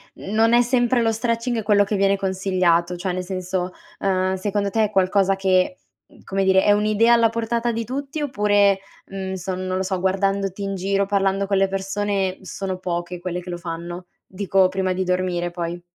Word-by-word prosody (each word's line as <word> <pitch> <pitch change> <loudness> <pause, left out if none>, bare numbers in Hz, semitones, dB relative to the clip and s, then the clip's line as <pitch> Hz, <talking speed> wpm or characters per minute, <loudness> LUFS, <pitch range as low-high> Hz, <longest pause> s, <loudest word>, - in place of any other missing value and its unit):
non 225 +3 +1
è 240 - +6
sempre 245 0 +2
lo 225 -1 +2
stretching 230 +1 -1
quello 205 -1 +4
che 205 +1 -2
viene 195 0 +2
consigliato 185 -3 +1
cioè, 180 +1 -3
nel 185 0 -3
senso, 185 0 -3 0.3
uhm, 185 -1 +1
secondo 200 +1 -1
te 220 0 +2
è - - -3
qualcosa 195 0 +2
che, 190 +5 +1 0.3
mhmm, - - -21
come 195 0 -1
dire, 190 0 +4
è 205 - +4
un'idea 215 +3 +3
alla 230 -1 +4
portata 230 +1 -1
di 230 0 -3
tutti? 275 +5 -4
Oppure, 205 -7 +2 0.3
mhmm, 190 -1 -5
so 185 0 -4
non 185 0 -3
lo 190 - -1
so 190 -1 -2
guardandoti 195 +1 0
in 195 0 -2
giro, 195 +1 0
parlando 195 0 +1
con 200 0 +1
le 195 0 +3
persone 195 0 -2
sono 190 0 -5
poche 175 -1 -4
quelle 180 0 -4
che 180 - -10
lo 175 - -4
fanno? 175 +1 -6 0.2
Dico, 190 0 +2
prima 190 0 -1
di 190 - -1
dormire 180 -1 -1
poi? 175 0 -4
195 Hz, 190 wpm, -22 LUFS, 185-205 Hz, 0.3 s, è